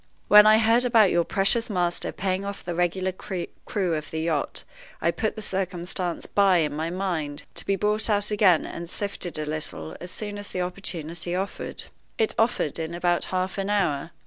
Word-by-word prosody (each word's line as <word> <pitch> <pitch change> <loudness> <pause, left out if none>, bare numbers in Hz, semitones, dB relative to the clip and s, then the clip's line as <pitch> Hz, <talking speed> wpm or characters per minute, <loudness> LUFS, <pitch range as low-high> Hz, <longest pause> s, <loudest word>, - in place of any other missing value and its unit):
"When 210 +1 +9
I 215 0 +7
heard 230 +2 +4
about 225 -5 +5
your 170 0 +3
precious 215 +7 +2
master 175 -3 0
paying 190 0 -1
off 200 0 -6
the 175 - -3
regular 180 +2 0
crew 185 0 -3
of 155 -1 -3
the 160 - -3
yacht 160 -3 -1 0.4
I - - +2
put 220 -1 -2
the 215 - -6
circumstance 180 -2 -2
by 195 -3 +4
in 150 -3 +1
my 160 +2 -2
mind, 170 -6 -3
to - - -6
be 195 - +3
brought 210 +3 0
out 205 0 +3
again 195 -6 +4
and 170 0 -7
sifted 200 -4 -4
a 155 - -2
little 150 - -5
as 180 - -6
soon 205 +1 -5
as 205 - -6
the 180 - -3
opportunity 175 -2 -4
offered. 195 +2 -4 0.3
It 220 - +1
offered 225 - +1
in 165 +1 -3
about 175 0 +1
half 185 +1 -2
an 195 +1 -2
hour. 165 -8 +1
185 Hz, 190 wpm, -25 LUFS, 170-205 Hz, 0.4 s, When